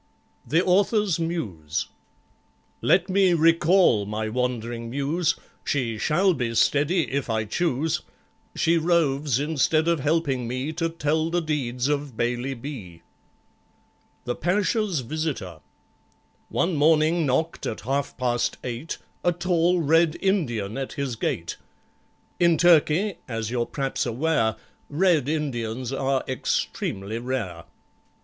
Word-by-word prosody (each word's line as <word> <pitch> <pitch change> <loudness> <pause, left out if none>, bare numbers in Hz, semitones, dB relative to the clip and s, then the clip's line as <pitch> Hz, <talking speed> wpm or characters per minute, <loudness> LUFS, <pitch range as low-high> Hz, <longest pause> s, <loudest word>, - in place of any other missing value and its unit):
The 160 +8 +2
Author's 195 -1 +2
Muse 100 - -3 1.0
Let 180 0 +3
me 190 -2 +3
recall 165 - +4
my 110 +1 -3
wandering 120 -1 -2
Muse; 155 +6 0 0.3
She 115 -6 -1
shall 185 - +3
be 120 -6 -2
steady 150 +6 +2
if 140 -2 -2
I 110 -1 0
choose— 155 +4 0 0.5
She 165 +1 +2
roves, 150 -5 +1
instead 155 +2 +1
of 170 -2 +2
helping 145 -4 0
me 130 +6 -3
To 165 +1 -1
tell 160 0 0
the 175 +1 +1
deeds 135 -6 -1
of 145 -4 -2
BAILEY 120 +3 -1
B. 115 - -8 1.2
The 120 - -1
Pasha's 190 - 0
Visitor 125 - -4 0.9
One 170 0 0
morning 155 +2 +3
knocked, 160 +6 -1
at 110 - -4
half 135 +3 -2
past 120 -2 0
eight, 125 +6 -4 0.3
A 175 - +3
tall 175 0 +1
Red 165 +1 +3
Indian 130 - 0
at 135 - -4
his 140 -5 -3
gate. 85 -6 -3 0.8
In 170 -2 +4
Turkey, 175 +3 +4
as 115 -2 -3
you're 120 -1 -1
p'raps 135 -2 -2
aware, 120 -3 +1 0.3
Red 155 -3 +2
Indians 130 -5 -2
are 135 0 0
extremely 110 -4 -2
rare. 115 -10 -4
145 Hz, 120 wpm, -25 LUFS, 120-165 Hz, 1.2 s, recall